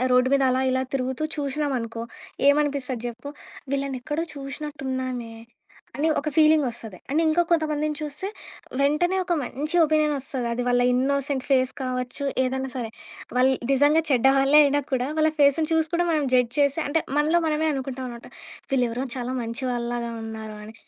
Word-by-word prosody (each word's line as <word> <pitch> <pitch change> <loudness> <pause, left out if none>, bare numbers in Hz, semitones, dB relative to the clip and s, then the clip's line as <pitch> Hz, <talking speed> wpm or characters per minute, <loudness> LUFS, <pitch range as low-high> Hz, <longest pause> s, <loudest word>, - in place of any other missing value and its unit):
ఆహ్, 255 - +1
రోడ్డు 250 0 +4
మీద 275 - +3
అలా 255 +1 +1
ఇలా 260 0 +1
తిరుగుతూ 260 +2 -2
చూసినాం 285 0 -1
అనుకో 230 0 -5 0.5
ఏమనిపిస్తది 280 -4 +1
జెప్పు? 240 +4 -7 0.4
వీళ్ళని 275 -2 -1
ఎక్కడో 310 +4 -2
చూసినట్టు 285 +1 -6
ఉన్నామే 255 -3 -3 0.6
అని 310 +3 +1
ఒక 305 - -3
ఫీలింగ్ 310 -1 +5
ఒస్తది. 225 -5 -8
అండ్ 310 +3 +2
ఇంకా 315 +2 +3
కొంతమందిని 305 -2 +1
చూస్తే 300 +4 -4 0.5
వెంటనే 300 +7 +2
ఒక 355 -1 -2
మంచి 295 +7 -3
ఒపీనియన్ 305 -1 +2
ఒస్తది. 260 -2 -4
అది 245 +1 -1
వాళ్ళ 245 0 +3
ఇన్నోసెంట్ 270 +1 0
ఫేస్ 260 -1 +3
కావచ్చు 255 +2 -3 0.2
ఏదన్నా 265 +1 -1
సరే. 235 -3 -4 0.5
వాళ్ళు 260 +1 +4 0.2
నిజంగా 290 +4 +4
చెడ్డ 260 -2 +3
వాళ్ళే 275 +2 +5
అయినా 285 0 +2
కూడా 255 0 +1
వాళ్ళ 315 0 +3
ఫేసుని 290 +2 +4
చూసి 320 0 +2
కూడా 350 +1 +2
మనం 305 -3 +1
జడ్జ్ 250 -2 +3
చేసి 285 +1 +3
అంటే, 305 +3 +1 0.2
మనలో 310 +3 +3
మనమే 310 0 +1
అనుకుంటాం 265 -1 -4
అనమాట. 235 -1 -10 0.4
వీళ్లేవరో 250 0 +1
చాలా 250 +1 -3
మంచి 230 +3 -5
వాళ్ళలాగా 240 -1 -2
ఉన్నారు 220 -1 -7
అని. 220 +1 -11
270 Hz, 165 wpm, -24 LUFS, 250-300 Hz, 0.6 s, ఫీలింగ్